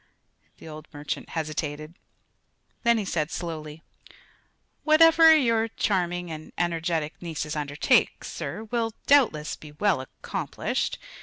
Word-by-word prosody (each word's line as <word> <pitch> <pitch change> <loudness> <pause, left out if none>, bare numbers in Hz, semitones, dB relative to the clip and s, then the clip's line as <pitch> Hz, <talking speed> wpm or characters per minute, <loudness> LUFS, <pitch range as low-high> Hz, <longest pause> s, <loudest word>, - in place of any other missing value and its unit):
The - - -13
old 155 0 -9
merchant 145 0 -5
hesitated. 155 0 -4 0.9
Then 235 -1 +3
he 210 - -2
said 155 -4 -1
slowly: 160 -3 -6 1.0
"Whatever 325 +1 +7
your 230 -5 +2
charming 180 -5 -1
and 155 0 -8
energetic 165 -2 -1
nieces 160 -2 -4
undertake, 145 -1 +1
sir, 215 - -5
will 225 0 -2
doubtless 230 - +3
be 150 -1 -13
well 180 -2 +1
accomplished. 130 - -3
165 Hz, 110 wpm, -26 LUFS, 155-225 Hz, 1.0 s, Whatever